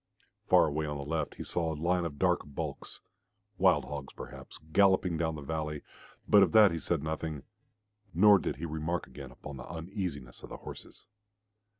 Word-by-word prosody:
Far - - +6
away 75 0 -2
on 75 0 -3
the 70 - -6
left 80 +2 -2
he - - -6
saw 85 -2 -1
a - - -3
line 90 +2 +1
of 75 -4 -5
dark 90 +1 +2
bulks 70 -2 -6 0.6
wild 90 -6 +4
hog 70 -1 -6
perhaps, - - -10 0.2
galloping 95 -3 +4
down 80 0 -1
the 75 - -7
valley, 75 0 -3 0.4
but 105 - +7
of 90 -5 +3
that 105 -3 +8
he 85 - -2
said 80 -2 -1
nothing, 80 -2 -4 0.7
nor 100 +4 +6
did - - -3
he 80 +5 -5
remark 80 +2 -2
again 65 - -10
upon 75 -2 -10
the - - -9
uneasiness 85 - -5
of - - -10
the - - -7
horses. - - -11
80 Hz, 185 wpm, -30 LUFS, 75-90 Hz, 0.7 s, that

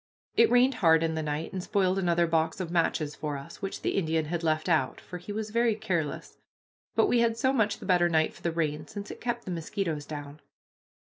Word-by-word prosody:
It 230 - +6
rained 250 +2 +5
hard 160 -2 +5
in 165 0 0
the 160 - -2
night 150 +3 -3
and 185 - -3
spoiled 190 -1 +1
another 175 -2 +2
box 160 0 0
of 175 -3 -4
matches 165 -3 +1
for 150 -1 -4
us, 140 - -11
which 195 - -5
the - - +1
Indian 160 -4 0
had 170 +2 -2
left 155 0 0
out, 155 -7 +1
for 180 - -8
he 180 +4 -8
was 215 0 -4
very 235 -1 +2
careless; 170 -8 -3 0.6
but - - +5
we 245 - +3
had 230 -1 +2
so 260 +2 +2
much 215 -5 +1
the - - -10
better 175 -2 +3
night 160 -1 +2
for - - -16
the 170 - 0
rain, 155 -2 -2
since 205 +6 -7
it - - -10
kept 240 0 -2
the 185 - -4
mosquitoes 165 -2 -3
down. 145 -1 -7
170 Hz, 230 wpm, -28 LUFS, 155-205 Hz, 0.6 s, It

